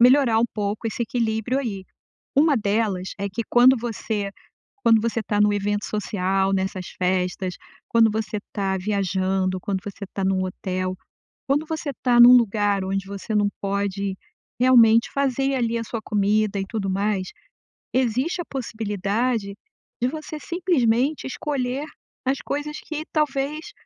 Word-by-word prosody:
melhorar 250 -2 +6
um - - +4
pouco 210 +1 -2
esse 230 +2 -2
equilíbrio 230 +2 -1
aí, 200 -8 -4 0.5
uma 290 0 +5
delas 200 -3 0
é 200 0 -3
que 225 +5 -3
quando 250 +2 +6
você 220 -3 -3 0.5
quando 225 -2 +5
você 230 -1 -1
tá 205 0 +1
no 210 0 +4
evento 205 0 -1
social, 195 -2 0
nessas 190 -1 -2
festas, 180 0 -1 0.3
quando 225 -2 +5
você 215 0 -2 0.2
tá 195 -1 0
viajando, 190 -1 0
quando 190 0 -3
você 200 0 -7
tá 195 - -2
num 190 0 +1
hotel, 185 0 -3 0.5
quando 290 +3 +1
você 315 -2 -3
tá 245 -2 +4
num 245 +1 +10
lugar 205 -3 +2
onde 195 0 -2
você 200 +2 -5
não 205 -1 +3
pode 200 -1 -2 0.4
realmente 230 -3 +6
fazer 275 0 +1
ali 235 -2 0
a 230 - -3
sua 230 +1 -4
comida 210 0 +1
e 195 - -2
tudo 200 -2 -3
mais, 195 -1 0 0.7
existe 260 +8 +1
a - - -13
possibilidade 220 - -2 0.5
de - - +4
você 310 +1 -6
simplesmente 295 -7 +1
escolher 270 0 -2 0.4
as 265 +1 +1
coisas 295 +1 -3
que 310 0 -5
talvez 300 +4 -1
220 Hz, 145 wpm, -23 LUFS, 195-255 Hz, 0.7 s, num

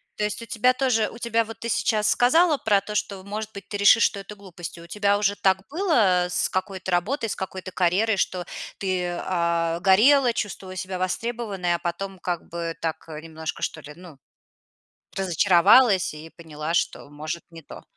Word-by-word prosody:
То 210 - -3
есть 210 +2 -2
у - - -8
тебя 250 +3 +2
тоже 250 -5 +1
у - - -11
тебя 230 -1 +1
вот 225 +1 -10
ты 230 - -5
сейчас 215 -1 +1
сказала 310 +5 +4
про 205 -5 +2
то, 210 +2 -7
что, 195 -2 -2
может 215 +2 -5
быть, 200 - -10
ты 205 - -4
решишь, 200 +3 +6
что 200 - +1
это 200 +1 -9
глупость. 180 -4 -9
И - - -11
у 170 - -13
тебя 205 +2 +1
уже 205 -1 +1
так 190 -2 +2
было, 235 - +2
э, - - -6
с - - 0
какой-то 185 0 -3
работой, 225 - 0
с - - -2
какой-то 185 -1 -6
карьерой, 190 +5 +1
что 180 -1 -1 0.3
ты, 185 -2 -1
а, 170 -1 -1
горела, 240 +7 +5
чувствовала 190 -4 -5
себя 185 0 -5
востребованной, 195 -2 -2
а - - -4
потом 190 +2 -5
как 175 -2 -4
бы 170 -1 -4
так, 165 -1 -3
э, 155 0 -7
немножко, 160 0 -6
что 155 - -3
ли, 150 +1 -11
ну, 175 -5 -13 1.0
разочаровалась 190 +3 +4
и 155 +2 -10
поняла, 160 0 -5
что, 145 - -1
может, 155 +3 -6
не 165 -1 -12
то? - - -11
190 Hz, 195 wpm, -24 LUFS, 175-215 Hz, 1.0 s, решишь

